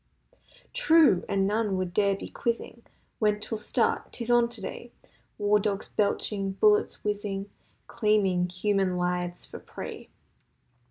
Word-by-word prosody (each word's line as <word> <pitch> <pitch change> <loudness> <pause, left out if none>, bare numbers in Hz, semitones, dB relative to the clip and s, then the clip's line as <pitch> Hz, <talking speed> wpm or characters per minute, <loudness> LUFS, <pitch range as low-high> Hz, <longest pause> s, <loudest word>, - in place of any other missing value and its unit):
True! 325 - +5
And 195 -1 +2
none 210 -1 0
would 185 -2 -3
dare 200 0 +3
be - - -7
quizzing 235 0 -3 0.4
When 210 -1 +2
'twill 215 +1 -5
start—'tis 235 +2 -1
on 240 -1 +4
today— 235 +1 -8 0.5
War 210 0 +3
dogs 200 -1 -2
belching—bullets 210 - +1
whizzing— 205 -1 -3 0.3
Claiming 200 -5 +1
human 190 0 0
lives 180 0 -2
for - - -9
prey. - - -8
205 Hz, 115 wpm, -27 LUFS, 195-225 Hz, 0.5 s, True